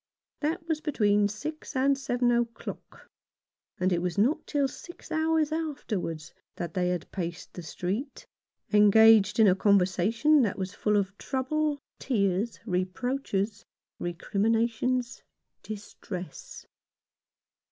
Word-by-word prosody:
That 325 +3 -2
was 315 -2 -1
between 210 -8 +2
six 300 +9 -6
and 275 +2 +3
seven 245 -2 0
o'clock; 235 -1 -4 0.7
and 185 0 +2
it 170 - 0
was 180 +1 -2
not 265 +10 +2
till 285 -2 +1
six 345 +6 -12
hours 315 -1 +1
afterwards 210 - -3 0.2
that 170 -2 -5
they 180 -1 +1
had 180 -2 -3
paced 170 -3 -5
the 180 - -7
street, 190 - -4 0.5
engaged 210 0 +6
in 220 - +7
a 185 - +6
conversation 200 - +3
that 215 -6 0
was 190 0 -4
full 210 -1 +1
of 200 -1 -1
trouble, 290 +3 -1 0.2
tears, 205 -2 0
reproaches, 205 +2 -2 0.4
recriminations, 225 +7 0 0.4
distress. 195 -5 -8
220 Hz, 115 wpm, -28 LUFS, 190-270 Hz, 0.7 s, in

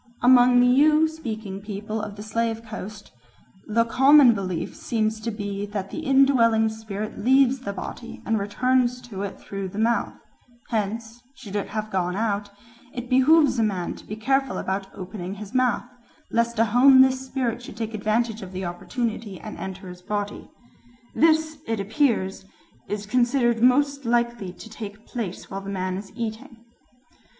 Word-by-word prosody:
Among 245 0 +6
the 245 - +5
Ewe 300 +5 +5
speaking 220 -11 -6
peoples 210 +1 -5
of 210 -1 -6
the 205 - -8
Slave 225 +1 -2
Coast 215 -2 -8 0.6
"the 230 +2 +2
common 265 +1 +6
belief 185 -5 -4
seems 220 -1 -1
to 230 - -2
be 205 -2 -4
that 200 -2 -5
the - - -5
indwelling 265 -6 +4
spirit 215 -1 -6
leaves 265 +2 +4
the 225 -6 -4
body 205 +4 -7
and 225 -1 +1
returns 250 +4 +1
to 220 -6 -7
it 200 -1 -5
through 195 -1 -5
the 200 - -9
mouth; 230 +2 +1 0.5
hence, 225 +2 -3
should 210 -6 -9
it 205 - -1
have 215 0 -4
gone 180 -1 -1
out, 205 -1 -1 0.4
it 245 0 -7
behoves 275 +1 +5
a - - +3
man 190 -5 -1
to - - -13
be 210 - -5
careful 270 +4 0
about 190 +1 -2
opening 190 0 -6
his 205 +2 -9
mouth, 255 -2 +1 0.5
lest 235 0 +1
a 225 - +4
homeless 260 +3 +6
spirit 255 -3 -2
should 235 -3 -10
take 225 0 -4
advantage 220 +1 0
of 190 -1 -9
the 185 0 -4
opportunity 210 +3 -4
and 215 - -8
enter 190 0 -7
his 180 0 -10
body. 205 +1 -4 0.6
This, 315 -1 +2
it 225 -1 -1
appears, 200 -3 0 0.4
is 210 0 -4
considered 240 0 +2
most 280 +3 +3
likely 235 -4 0
to 185 - -12
take 215 -1 -9
place 215 -7 -6
while 195 0 -4
the 195 - -7
man 185 -1 -2
is 195 +1 -7
eating." 230 0 -5
220 Hz, 165 wpm, -24 LUFS, 200-250 Hz, 0.6 s, Among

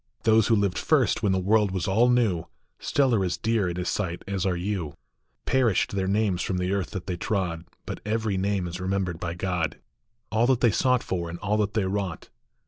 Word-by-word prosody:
Those 110 -1 +4
who 115 - +4
lived 100 -3 +1
first, 140 -7 +2
when 105 -4 +2
the 95 - +2
world 105 +2 +3
was 95 -3 -2
all 110 +6 +4
new, 110 -9 +2 0.3
Still 135 -3 +2
are 100 -4 +2
as 90 -1 -1
dear 110 -2 +1
in 85 - -4
his 90 0 -2
sight 90 -4 -2
as 100 -1 -1
are 90 - +1
you; 90 -5 -3 0.5
Perished 125 -7 +2
their 95 -1 -1
names 100 -2 +1
from 90 - -1
the 90 +1 -1
earth 100 -2 -1
that 95 -4 -6
they 90 -2 -3
trod, 85 -4 -2 0.2
But - - -5
every 110 -1 -1
name 95 0 0
is 90 +2 -6
remembered 95 -2 -1
by 85 -1 -4
God, 90 -4 -2 0.5
All 115 +2 +3
that 130 -2 +3
they 120 - +5
sought 125 +3 +2
for, 85 -2 -3
and 85 - -6
all 105 +3 0
that 105 0 -1
they 105 -3 +2
wrought. 95 -3 -3
100 Hz, 220 wpm, -26 LUFS, 90-110 Hz, 0.5 s, they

